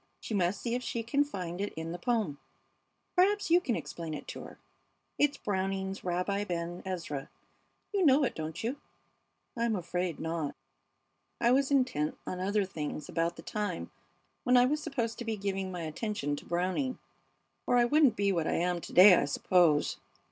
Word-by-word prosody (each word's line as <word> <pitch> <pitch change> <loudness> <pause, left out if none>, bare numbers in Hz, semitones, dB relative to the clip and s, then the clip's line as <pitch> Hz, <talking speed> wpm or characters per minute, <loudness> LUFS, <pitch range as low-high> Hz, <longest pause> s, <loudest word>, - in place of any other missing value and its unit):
She - - -6
must 185 -1 +1
see 235 - -2
if 250 - 0
she 235 -2 -3
can 280 +5 +2
find 185 -9 -5
it 205 - -2
in 160 +1 -4
the 175 - -5
poem. 205 -10 0 0.8
Perhaps 390 0 +3
you 350 +1 +6
can 240 -8 0
explain 165 -2 -5
it - - -8
to - - -6
her. - - -11 0.6
It's 290 -1 +3
Browning's 195 0 -2
'Rabbi 180 +3 0
Ben 175 -1 -3
Ezra.' 165 -7 -4 0.6
You 395 -2 +2
know 285 -2 +6
it, 260 - 0
don't 160 +3 -5
you?" 245 +5 -1 0.8
"I'm 235 -2 +1
afraid 175 -2 -2
not. 160 -3 -2 0.8
I 235 - +4
was 270 +1 +3
intent 250 - +1
on 180 - -4
other 200 +2 +1
things 150 -5 -5
about 165 0 0
the - - -11
time 205 -5 -3 0.5
when 250 0 +5
I 245 - +7
was 300 +4 0
supposed 245 -7 -2
to - - -3
be 225 -1 -2
giving 195 -1 -2
my 180 -2 -5
attention 155 -2 -2
to - - -10
Browning, 185 +10 -1 0.7
or 245 - +4
I 240 - +5
wouldn't 280 -2 +4
be 200 0 +2
what 165 -4 0
I - - +1
am 175 0 0
to - - -9
day, 185 +2 +10
I 170 - +4
suppose. 155 +1 +3
195 Hz, 185 wpm, -31 LUFS, 170-240 Hz, 0.8 s, day